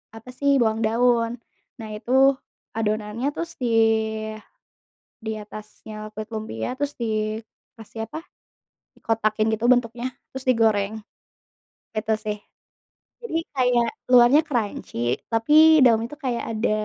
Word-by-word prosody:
apa 225 +3 -12
sih, 280 +2 +2
bawang 220 -1 +1
daun, 230 0 +2 0.5
nah 220 -3 -8
itu 210 +3 -6 0.7
adonannya 215 +2 -2
terus 335 +1 -4
di 245 - 0 1.6
di 220 - -2
atasnya 215 0 -10
kulit 215 0 -6
lumpia 215 - -4
terus 290 +1 -2
dikasih 220 0 -5
apa, 315 - -5 0.9
kotakin 215 -1 +1
gitu 220 +1 -2
bentuknya 240 0 0 0.3
terus 265 0 -7
digoreng. 220 -4 +3 1.1
Gitu 220 0 0
sih. 210 0 -2 0.8
Jadi 465 -9 -3 0.2
kayak 250 -3 +2 0.2
luarnya 245 +4 +7
crunchy 175 - -2
tapi 305 +7 +6
dalamnya 230 -2 +4
itu 295 - -23
kayak 240 -2 -1
ada 215 +1 0
225 Hz, 115 wpm, -23 LUFS, 215-250 Hz, 1.6 s, luarnya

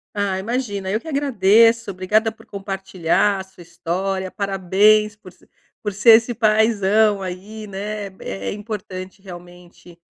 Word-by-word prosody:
Ah, 200 -2 -1
imagina 205 -3 -3
eu 215 +3 -1
que 320 - -14
agradeço 230 -5 +3
obrigada 210 +4 +1
por 220 - -19
compartilhar 195 -1 -1
a - - -5
sua 190 -2 -16
história, 185 +3 -3
parabéns 200 +2 +2
por 200 -3 -15
se - - -26 0.3
por 210 - -3
ser 210 +4 +5
esse 225 +2 +5
paizão 215 -2 +2
aí, 200 +4 -7
né, 205 +1 -5 0.2
é 95 0 -5
importante 200 -3 -7
realmente 175 -1 -14
200 Hz, 135 wpm, -20 LUFS, 185-215 Hz, 0.3 s, ser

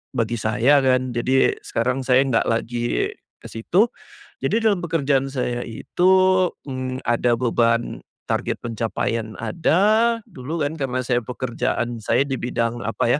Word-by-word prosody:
bagi 115 -1 0
saya 120 +7 +3
kan, 130 -1 +2
jadi 130 +3 +2
sekarang 125 +3 -1
saya 130 +1 +4
nggak 115 -3 +2
lagi 120 - -1 0.4
ke - - -8
situ. 180 - +2 0.6
Jadi 225 - +2
dalam 205 -5 +3
pekerjaan 140 -5 +1
saya 125 -2 -2
itu, 175 +11 +1 0.6
mmm, 130 0 -4
ada 120 0 +2
beban 115 -1 +1 0.2
target - - -1
pencapaian 115 -1 -2
ada, 215 +7 +2
dulu 150 +5 -4
kan 155 +2 -3
karna 130 -1 -1
saya 120 0 +1
pekerjaan 120 -1 -3
saya 120 +5 +2
di 135 -2 -4
bidang 120 -1 -2
apa 120 +4 +1
125 Hz, 135 wpm, -22 LUFS, 115-140 Hz, 0.6 s, saya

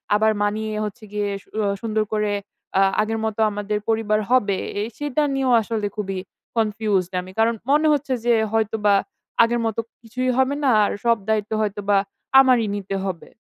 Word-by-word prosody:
আবার 220 +1 +3
মানিয়ে 215 +1 -1
হচ্ছে 215 +2 -8
গিয়ে 205 -1 -1
সু - - -29 0.2
আ - - +1
সুন্দর 220 -1 0
করে 210 -1 0 0.5
আ - - +5 0.2
আগের 225 +1 -1
মতো 220 0 -3
আমাদের 205 +1 -2
পরিবার 220 -1 +1
হবে, 205 -7 +3 0.2
এ - - 0 0.2
সেটা 295 0 0
নিয়েও 265 -2 +1
আসলে 215 -1 -2
খুবই 195 -3 -3 0.4
কনফিউজড 210 -4 0
আমি। 185 +1 -11
কারণ 230 +1 +4 0.2
মনে 305 +2 +4
হচ্ছে 275 -2 -1
যে 240 - +4 0.2
হয়তোবা 215 -2 +2 0.5
আগের 235 +1 +1
মতো 225 0 -1 0.2
কিছুই 255 +3 -2
হবে 265 +2 +2
না 270 - +4 0.2
আর - - -1
সব 230 -1 +4
দায়িত্ব 215 -1 0
হয়তোবা 205 -1 +1 0.4
আমারই 250 -5 +4
নিতে 195 -1 -4
হবে। 180 -4 -5
220 Hz, 170 wpm, -22 LUFS, 205-235 Hz, 0.5 s, আ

